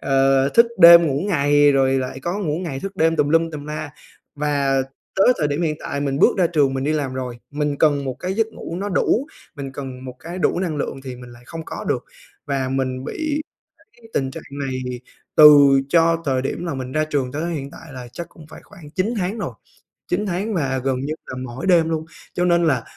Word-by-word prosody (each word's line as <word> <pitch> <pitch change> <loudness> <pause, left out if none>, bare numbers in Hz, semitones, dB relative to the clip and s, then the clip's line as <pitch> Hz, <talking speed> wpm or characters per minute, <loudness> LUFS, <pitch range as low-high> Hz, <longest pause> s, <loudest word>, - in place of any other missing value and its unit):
ờ, 135 0 +3
thức 235 +11 +5
đêm 170 -1 +9
ngủ 140 -1 0
ngày 145 -3 +4
rồi 135 -1 +2
lại 130 +1 -4
có 175 +7 -3
ngủ 160 -6 -2
ngày 160 -7 -4
thức 195 0 -6
đêm 165 +1 +2
tùm 150 -1 +2
lum 165 +1 +2
tùm 150 -2 -7
la. 150 -1 -5 0.4
Và 140 -2 +1 0.3
tới 195 - +4
thời 150 - +1
điểm 145 +4 -1
hiện 155 -2 0
tại 140 - -4
mình 140 -1 -1
bước - - +4
ra 180 - +4
trường 145 -5 +1
mình 135 0 -2
đi 150 - +1
làm 140 -4 -2
rồi, 125 -2 -5
mình 150 0 -2
cần 145 -3 +2
một 130 -1 -3
cái 185 +1 -2
giấc 225 0 +1
ngủ 170 -6 -7
nó 200 +3 -3
đủ, 225 +7 +1 0.3
mình 135 -1 -6
cần 130 -2 -7
một 130 -1 -7
cái 175 +3 -7
đủ 175 - +1
năng 170 -5 -2
lượng 135 -1 -4
thì 130 -1 -6
mình 125 0 -12
lại 120 +1 -15
không 165 -1 -7
có - - -7
được. - - -1 0.4
Và 135 -2 -1
mình 130 -1 -2
bị 305 - -2 0.6
cái 230 -1 -17
tình 135 -1 0
trạng - - -9 0.2
này 130 -2 -3 0.6
từ 145 -3 +8
cho 165 0 +3
thời 130 -3 0
điểm 140 +5 -3
là 165 - -3
mình 130 -1 -5
ra 155 +2 +1
trường 140 -5 -2
tới 165 +4 -3
hiện 140 -2 -5
tại 160 0 -13
là 125 -2 -8
chắc 170 - -7
cũng 160 - -15
phải - - -11
khoảng 170 -8 -14
9 190 +8 -1
tháng 190 +5 -2
rồi, 200 - -4 0.6
9 195 +4 -1
tháng 200 +3 -2
và 135 -7 0
gần 130 -1 0
như 145 +3 -3
là - - -6
mỗi 130 +8 -6
đêm 170 -3 +4
luôn. 160 -1 -2 0.3
Cho 180 - 0
nên 170 -1 +3
là 130 -7 +1
150 Hz, 230 wpm, -21 LUFS, 135-170 Hz, 0.6 s, đêm